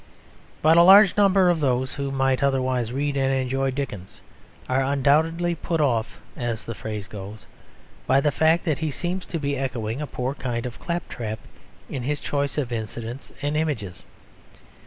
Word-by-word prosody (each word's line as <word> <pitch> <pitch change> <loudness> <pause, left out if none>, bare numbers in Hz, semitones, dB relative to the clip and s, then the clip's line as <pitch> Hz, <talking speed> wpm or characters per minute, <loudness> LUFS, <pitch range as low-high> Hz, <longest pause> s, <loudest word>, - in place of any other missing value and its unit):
But 160 +2 +6
a - - +9
large 195 +2 +8
number 195 -2 +4
of 175 -2 +3
those 130 -2 0
who 140 -1 -3
might 135 -1 +1
otherwise 130 -4 +1
read 140 +2 -1
and 135 -1 +1
enjoy 135 0 0
Dickens 130 -9 -5 0.5
are 130 +1 +1
undoubtedly 155 +5 +2
"put 165 0 -2
off" 120 -7 0 0.2
(as 115 -3 -3
the 115 - -4
phrase 105 -2 -6
goes) 105 +1 -9 0.6
by 135 - +5
the 145 +1 +2
fact 160 +5 +2
that 155 -3 0
he 160 -1 -1
seems 180 +5 -3
to 170 - -3
be 140 -2 -1
echoing 125 -2 -3
a 150 - -3
poor 125 +1 -3
kind 120 -4 -3
of 125 - -6
claptrap 120 -10 -4 0.5
in 135 - -5
his 145 +4 -2
choice 140 -1 -2
of 130 -5 -1
incidents 115 +2 -5
and 145 +1 0
images. 110 - -2
135 Hz, 170 wpm, -24 LUFS, 120-155 Hz, 0.6 s, a